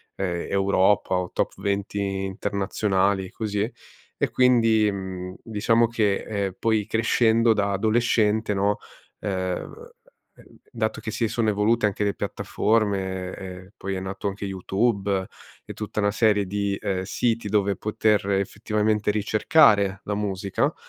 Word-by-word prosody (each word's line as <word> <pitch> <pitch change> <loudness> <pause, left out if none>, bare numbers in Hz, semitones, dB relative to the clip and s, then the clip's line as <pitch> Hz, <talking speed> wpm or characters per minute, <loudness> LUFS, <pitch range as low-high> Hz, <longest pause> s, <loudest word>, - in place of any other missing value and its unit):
ehm, 90 -3 -3
Europa 100 0 +2
o 90 -1 -2
top - - -1
20 100 -1 -2
internazionali 95 0 0
e - - -16
così, 105 +1 -2 0.5
e - - 0
quindi, 115 -4 +4
mhmm, 95 -2 -6
diciamo 115 +1 +2
che, 110 -4 +1
ehm, 100 -3 -3
poi 110 -2 +1
crescendo 115 0 +3
da 100 -1 0
adolescente, 110 0 +2
no 100 +1 +1 0.5
Uhm, 95 - -4 0.8
dato - - -2
che - - -5
si 115 - 0
sono 110 0 0
evolute 105 +2 +2
anche 105 0 0
le 100 -1 0
piattaforme, 100 -2 -1
eh 95 -1 -7
e - - -22
poi 95 0 -4
è 95 - -2
nato 95 +2 -6
anche 100 +1 -4
YouTube 95 0 0 0.4
e - - -8
tutta 105 0 -5
una 100 -1 +2
serie 105 -2 +2
di, 100 +1 -1
ehm, 95 -1 -1
siti 115 +2 -1
dove 100 -1 +1
poter 105 -1 +1
effettivamente 105 +2 0
ricercare 105 -2 +3
la 105 - -2
musica, 100 -2 -1
100 Hz, 140 wpm, -24 LUFS, 95-110 Hz, 0.8 s, quindi